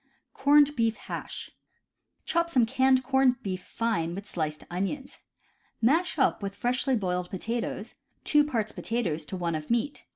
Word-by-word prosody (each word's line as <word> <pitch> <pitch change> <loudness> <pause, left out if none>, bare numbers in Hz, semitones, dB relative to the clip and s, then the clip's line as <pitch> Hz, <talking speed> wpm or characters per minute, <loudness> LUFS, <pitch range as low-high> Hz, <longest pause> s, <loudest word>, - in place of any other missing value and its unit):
Corned 290 +1 +5
Beef 230 -1 +1
Hash. - - -6 0.4
— - - -51
Chop 340 -2 +1
some 255 -8 +4
canned 260 +1 +3
corned 265 -1 +2
beef 185 -2 -3
fine 195 -8 -1
with 200 +1 -6
sliced 155 -6 -3
onions. 195 +10 -3 0.6
Mash 320 +10 +2
up 265 - +2
with 200 0 -4
freshly 250 +2 +1
boiled 180 -4 -1
potatoes, 225 +2 -3 0.3
two 295 -1 +4
parts 230 -8 -1
potatoes 175 -10 -2
to 185 - -5
one 170 -2 -1
of 155 -1 -4
meat. 240 +5 -1
230 Hz, 155 wpm, -28 LUFS, 185-265 Hz, 0.6 s, Corned